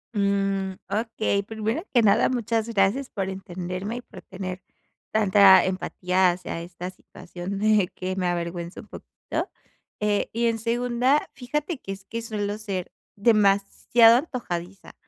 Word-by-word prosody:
Mm. 195 -1 0 0.2
Okey, 215 -1 0
primero 220 - -3
que 240 -4 +4
nada, 200 - +4
muchas 230 -2 -1
gracias 225 +6 +1
por 195 -2 -3
entenderme, 190 +3 -5
y - - -6
por - - -13
tener 185 -1 -6 0.5
tanta 200 -3 +6
empatía 185 0 +1
hacia 175 -1 -5
esta 175 +1 -7
situación 180 +1 -8
de 215 -3 +3
que 185 +1 -3
me 185 -2 -1
avergüenza 170 0 -3
un - - -17
poquito. - - -6 0.5
Eh, 210 -1 0
y 235 +1 0
en 225 -1 0
segunda, 245 +4 +1
fíjate 295 +4 -3
que 195 - -7
es 195 0 -12
que 230 0 -5
suelo 210 -2 -3
ser 195 -4 -4 0.2
demasiado 215 +2 +4
antojadiza. 195 - -5
200 Hz, 140 wpm, -25 LUFS, 185-230 Hz, 0.5 s, tanta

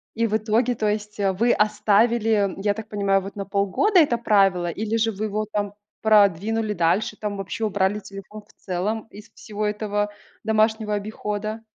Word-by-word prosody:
И 230 0 +1
в 215 0 +1
итоге, 225 +3 +1
то 215 -1 -1
есть, 210 0 -3
вы 200 +4 +2
оставили, 215 -1 +2
я 205 - +3
так 220 +1 -8
понимаю, 200 -2 +1
вот 195 +1 -9
на 200 -1 -4
полгода 200 - +2
это 285 -7 +3
правило, 195 -6 +3
или 215 +5 -3
же 225 0 +1
вы 210 +1 -4
его, 215 0 -2
там, 205 -1 -2 0.3
продвинули 215 +1 +3
дальше, 205 +4 0
там 210 -1 -4
вообще 195 +3 -4
убрали 205 0 0
телефон 200 +1 -10
в - - -23
целом 205 +5 -3
из 210 - -13
всего 210 0 -5
этого 210 0 -1 0.4
домашнего 220 -1 +1
обихода? 210 +1 -4
210 Hz, 170 wpm, -23 LUFS, 200-220 Hz, 0.4 s, я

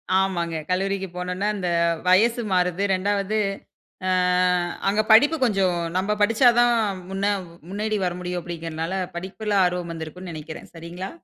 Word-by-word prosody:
ஆமாங்க. 175 -4 0
கல்லூரிக்கு 195 +1 -1
போனோன்ன, 180 +3 -2
அந்த 180 -3 -2 0.4
வயசு 230 +6 +4
மாறுது. 180 +1 +1
2வது 200 +2 -1 0.7
அ - - +1 0.8
அங்க 210 +2 +3
படிப்பு 290 +9 +6
கொஞ்சம், 195 -6 +2 0.2
நம்ப 205 +3 0
படிச்சா 225 +4 +4
தான் 240 0 +5 0.4
முன்ன 195 +1 0 0.4
முன்னேறி 215 +2 -2
வர 175 - -1
முடியும் 180 0 -3
அப்படிங்குறனால, 165 0 -5 0.2
படிப்பில 200 +4 -3
ஆர்வம் 180 -1 -1
வந்திருக்கும்ன் 165 +3 -7
நெனைக்கிறேன் 155 0 -8
சரிங்களா? 170 +3 -7
185 Hz, 130 wpm, -23 LUFS, 175-205 Hz, 0.8 s, படிப்பு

